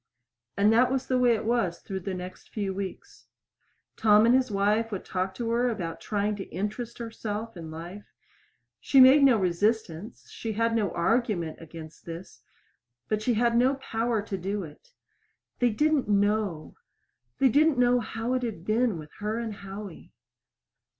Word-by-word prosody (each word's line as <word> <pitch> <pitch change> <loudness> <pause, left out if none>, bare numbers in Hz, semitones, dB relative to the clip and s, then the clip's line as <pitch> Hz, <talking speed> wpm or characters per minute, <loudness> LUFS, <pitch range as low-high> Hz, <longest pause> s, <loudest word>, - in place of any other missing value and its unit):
And 205 +2 +4
that 250 +3 +4
was 265 -1 -1
the 255 -1 +1
way 245 -2 +4
it 215 - -4
was 225 -7 +1
through 190 -2 -6
the 190 +1 -4
next 180 0 -9
few 200 -3 -3
weeks. 195 -1 -7 0.7
Tom 215 0 +5
and 235 - +5
his 260 -1 +3
wife 210 +3 +1
would 195 - -5
talk 190 0 -2
to 230 -1 -3
her 240 +2 +2
about 175 -8 -4
trying 210 0 -1
to 195 - -4
interest 215 +6 -4
herself 225 -1 -5
in 165 -2 -8
life. 170 +6 -8 0.7
She 270 - +3
made 265 +3 +8
no 265 -4 +6
resistance, 200 +1 -1
she 225 -1 -4
had 230 +2 +1
no 210 -4 +1
argument 175 -4 0
against 160 -1 -11
this; 165 +2 -9 0.7
but 215 -1 0
she 235 +2 +1
had 235 +1 +2
no 255 +3 +4
power 230 -4 -2
to 200 -2 -4
do 195 +2 -3
it. 160 - -13 0.7
They 245 - +4
didn't 295 +1 +1
know 205 -5 0 0.6
they 270 -1 +4
didn't 295 +3 +4
know 245 0 +4
how 225 +2 -3
it 255 - 0
had 220 -8 -5
been 225 -2 +1
with 155 -1 -10
her 210 +2 -2
and 230 -2 -3
Howie. 195 -1 -9
215 Hz, 170 wpm, -27 LUFS, 190-235 Hz, 0.7 s, made